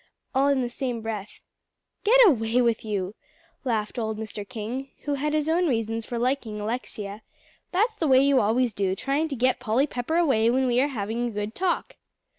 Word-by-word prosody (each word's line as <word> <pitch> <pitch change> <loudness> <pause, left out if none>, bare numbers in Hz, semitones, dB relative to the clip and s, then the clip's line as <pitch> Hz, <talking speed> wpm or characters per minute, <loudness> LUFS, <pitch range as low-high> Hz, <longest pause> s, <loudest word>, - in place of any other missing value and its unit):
all 270 +1 +3
in 275 -2 +2
the - - -1
same 250 -2 -3
breath. 215 -2 -6 0.6
"Get 475 +4 +5
away 230 - +2
with 235 -3 +2
you," 200 -3 -2 0.5
laughed 225 -3 -1
old 220 -1 -2
Mr. 215 -2 -6
King, 250 +4 -5
who 290 - -2
had 290 +2 -1
his 305 -1 +1
own 340 +2 +2
reasons 225 -3 -1
for 240 - -3
liking 240 -3 -1
Alexia, 210 -2 -4 0.5
"that's 435 +5 +1
the 325 - 0
way 260 -2 +6
you 275 -1 +4
always 230 +3 +2
do, 190 -1 0
trying 280 +9 0
to 285 - -4
get 255 +1 +2
Polly 245 +3 +2
Pepper 275 +4 -2
away 265 -10 +3
when 260 +2 +2
we 245 0 +3
are 280 - +2
having 235 -2 -2
a - - -4
good 210 +1 -4
talk." 360 +3 -1
245 Hz, 195 wpm, -26 LUFS, 220-275 Hz, 0.6 s, way